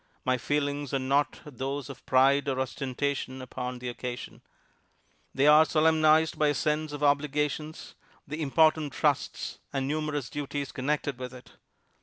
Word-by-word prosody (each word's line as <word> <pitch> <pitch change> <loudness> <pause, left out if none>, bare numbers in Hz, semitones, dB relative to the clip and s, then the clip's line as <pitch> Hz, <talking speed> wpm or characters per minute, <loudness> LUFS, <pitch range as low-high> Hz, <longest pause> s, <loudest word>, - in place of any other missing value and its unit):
My 130 -1 +2
feelings 145 0 -1
are 130 -1 -1
not 140 +2 +1
those 140 0 -4
of 140 -2 -10
pride 135 +2 +4
or 130 -1 -1
ostentation 130 0 -2
upon 125 0 -5
the 125 0 -7
occasion. 120 0 -6 0.9
"They 135 - +1
are 150 +1 +8
solemnized 160 0 +3
by 150 - +4
a 145 - +2
sense 150 0 0
of 145 0 -6
the - - +3
obligations, 150 +2 -1 0.3
the 150 +3 -5
important 155 0 +3
trusts, - - -1
and 135 -1 -1
numerous 150 -3 -2
duties 145 -1 -4
connected 140 -1 -2
with 125 0 -6
it. 125 - -14
145 Hz, 150 wpm, -28 LUFS, 130-150 Hz, 0.9 s, are